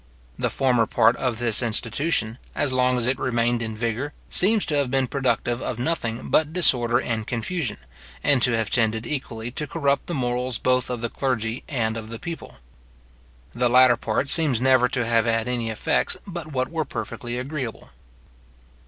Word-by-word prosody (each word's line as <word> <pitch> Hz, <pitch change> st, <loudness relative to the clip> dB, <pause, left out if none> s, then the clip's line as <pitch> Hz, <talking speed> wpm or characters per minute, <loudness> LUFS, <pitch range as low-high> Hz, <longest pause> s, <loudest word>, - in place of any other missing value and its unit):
The -, -, 0 dB
former 125 Hz, -4 st, +2 dB
part 115 Hz, -, +3 dB
of 125 Hz, -4 st, -1 dB
this 115 Hz, -1 st, +2 dB
institution, 115 Hz, +1 st, +1 dB, 0.2 s
as 140 Hz, -3 st, 0 dB
long 125 Hz, 0 st, +2 dB
as 120 Hz, -, -1 dB
it 130 Hz, +2 st, 0 dB
remained 120 Hz, -2 st, 0 dB
in 110 Hz, -1 st, -4 dB
vigour, 115 Hz, +6 st, -3 dB, 0.2 s
seems 210 Hz, +3 st, +4 dB
to 150 Hz, -, -1 dB
have 140 Hz, -3 st, 0 dB
been 135 Hz, 0 st, +1 dB
productive 125 Hz, -2 st, -1 dB
of 120 Hz, -, -3 dB
nothing 120 Hz, -4 st, -2 dB
but 155 Hz, -1 st, +3 dB
disorder 125 Hz, -9 st, +4 dB
and 110 Hz, -3 st, -3 dB
confusion, 125 Hz, +1 st, -3 dB, 0.5 s
and 140 Hz, -3 st, +3 dB
to 125 Hz, 0 st, +5 dB
have 110 Hz, -2 st, -2 dB
tended 110 Hz, -1 st, +1 dB
equally 120 Hz, -4 st, -5 dB
to 150 Hz, +4 st, -4 dB
corrupt 140 Hz, -3 st, 0 dB
the 175 Hz, -, -3 dB
morals 125 Hz, -1 st, -1 dB
both 125 Hz, -1 st, +1 dB
of 125 Hz, -2 st, -4 dB
the 120 Hz, -, -2 dB
clergy 115 Hz, -3 st, -2 dB
and 115 Hz, -5 st, -1 dB
of 110 Hz, -1 st, -7 dB
the 115 Hz, -, -6 dB
people. 165 Hz, +6 st, -8 dB, 1.0 s
The 120 Hz, 0 st, 0 dB
latter 125 Hz, 0 st, +6 dB
part 115 Hz, +4 st, -2 dB
seems 145 Hz, -5 st, +4 dB
never 130 Hz, -1 st, +4 dB
to 125 Hz, -3 st, -1 dB
have 115 Hz, -1 st, +2 dB
had 115 Hz, 0 st, 0 dB
any 120 Hz, -2 st, -2 dB
effects 110 Hz, -, 0 dB
but 170 Hz, -5 st, -7 dB
what 130 Hz, +1 st, -2 dB
were 165 Hz, -1 st, -1 dB
perfectly 120 Hz, -4 st, -6 dB
agreeable. 130 Hz, -2 st, -5 dB
125 Hz, 180 wpm, -23 LUFS, 115-135 Hz, 1.0 s, latter